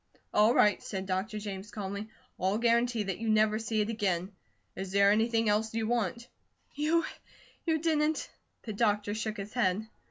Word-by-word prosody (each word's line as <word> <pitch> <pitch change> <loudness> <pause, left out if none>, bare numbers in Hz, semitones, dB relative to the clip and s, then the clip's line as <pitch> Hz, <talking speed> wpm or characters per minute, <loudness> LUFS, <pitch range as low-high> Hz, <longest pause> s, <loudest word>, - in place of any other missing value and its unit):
"All 215 +3 +5
right," 210 - +4
said 190 -2 -4
Dr. 190 +3 -2
James 205 -1 -6
calmly. 205 0 -5 0.3
"I'll 190 +3 +1
guarantee 235 -1 +2
that 195 -3 -3
you 225 0 -2
never 215 0 +3
see 220 -1 0
it 210 - -1
again. 195 -4 -1 0.4
Is 190 0 -5
there 200 0 +5
anything 225 +1 +2
else 215 +1 +1
you 225 -1 0
want?" 235 0 -1 0.5
"You 310 +2 +1 0.6
you 320 -1 +3
didn't 310 -1 +1 0.2
?" - - -47
The 220 - -5
doctor 205 -1 +1
shook 215 0 -3
his 200 +1 -6
head. 210 -3 +1
215 Hz, 170 wpm, -30 LUFS, 200-230 Hz, 0.6 s, All